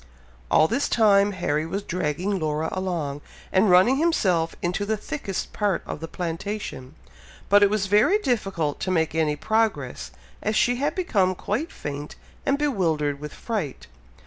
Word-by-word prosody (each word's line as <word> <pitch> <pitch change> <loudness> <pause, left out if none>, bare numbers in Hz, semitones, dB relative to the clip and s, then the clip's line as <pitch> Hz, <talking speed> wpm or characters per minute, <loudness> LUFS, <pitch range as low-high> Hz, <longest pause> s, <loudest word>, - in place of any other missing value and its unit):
All 155 - +5
this 245 - 0
time, 205 -2 +4
Harry 155 -5 -1
was 195 +4 -3
dragging 180 +3 -1
Laura 155 0 -1
along, 170 -7 -3 0.3
and 190 +2 +4
running 185 +9 +6
himself 190 - +1
into 180 +3 0
the 215 +1 -1
thickest 210 -4 -5
part 205 -4 0
of - - -5
the 165 - -6
plantation; 165 -5 -5 0.5
but 205 +1 +6
it 205 - +6
was 210 -1 0
very 210 - +4
difficult 195 - -1
to 190 - -3
make 160 -4 +1
any 155 -2 +1
progress, 220 +6 -1 0.3
as 215 - -1
she 245 +2 +3
had 285 +3 -1
become 195 - +1
quite 225 - -3
faint 145 0 -6 0.3
and 275 - +3
bewildered 165 - 0
with 150 0 -7
fright. 205 - -4
190 Hz, 155 wpm, -24 LUFS, 160-215 Hz, 0.5 s, running